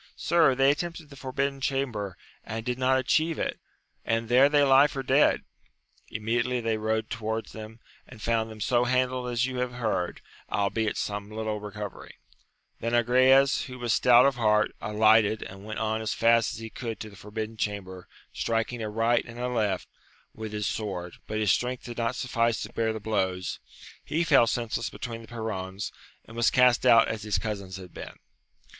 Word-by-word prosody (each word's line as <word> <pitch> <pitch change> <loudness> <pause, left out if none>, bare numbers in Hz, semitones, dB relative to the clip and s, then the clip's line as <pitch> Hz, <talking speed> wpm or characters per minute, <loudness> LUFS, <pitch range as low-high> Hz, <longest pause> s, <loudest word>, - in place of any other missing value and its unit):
— - - -30
Sir, 165 -6 +3
they 135 +1 +5
attempted 165 0 -5
the - - -10
forbidden 135 +1 -3
chamber, 120 -9 -2 0.3
and 110 +1 -5
did 125 0 -2
not 130 +1 +3
atchieve 155 +5 +1
it, - - -2 0.4
and 115 0 -1
there 130 +3 +6
they 145 -1 +4
lie 135 +1 +6
for 135 -1 -5
dead! 135 +3 +3 0.7
Immediately 120 +3 -1
they 115 -1 0
rode 110 0 -1
to 115 - -5
wards 110 +1 -3
them, 110 +1 -10 0.3
and 125 - -13
found 115 0 0
them 110 -1 -10
so 120 +2 +2
handled 125 0 0
as 120 0 +1
you 130 -1 -4
have 125 -1 -2
heard, 110 -7 -2 0.3
albeit 105 +3 0
some 105 0 -3
little 110 0 -3
recovering. 105 -1 -8 0.6
Then 115 +1 -2
Agrayes, 130 +3 +4
who 125 -2 -9
was 120 -2 0
stout 125 0 +6
of 140 -2 +2
heart, 105 -2 +3
alighted, 110 0 +3
and 95 +1 -10
went 110 0 -5
on 110 0 -1
as 110 -2 -2
fast 115 0 +3
as - - -8
he 110 0 -8
could 115 -3 -5
to 110 -2 -7
the - - -14
forbidden 110 +3 -6
chamber, 95 -4 -4 0.3
striking 115 +1 -1
aright 115 +2 +1
and 115 0 -11
aleft, 115 -6 -1 0.5
with 110 -1 -7
his 105 -1 -3
sword, 90 -6 -3
but 110 - -3
his 105 -2 +2
strength 125 0 -1
did 120 -1 -7
not 115 +2 0
suffice 115 -2 0
to 105 - -9
bear 115 -1 0
the 110 - -4
blows, 95 -4 -2 0.4
he 160 +4 0
fell 140 -7 +5
senseless 115 -1 -2
betwe^i 115 -2 -6
the 115 - -13
perrons, 100 -4 -5 0.3
and 115 - -13
was 120 0 +3
cast 125 0 +4
out 115 -2 +7
as 110 -1 -3
his 105 -1 0
cousins 100 -4 -4
had 90 -2 -11
been. - - -9
115 Hz, 185 wpm, -27 LUFS, 110-125 Hz, 0.7 s, out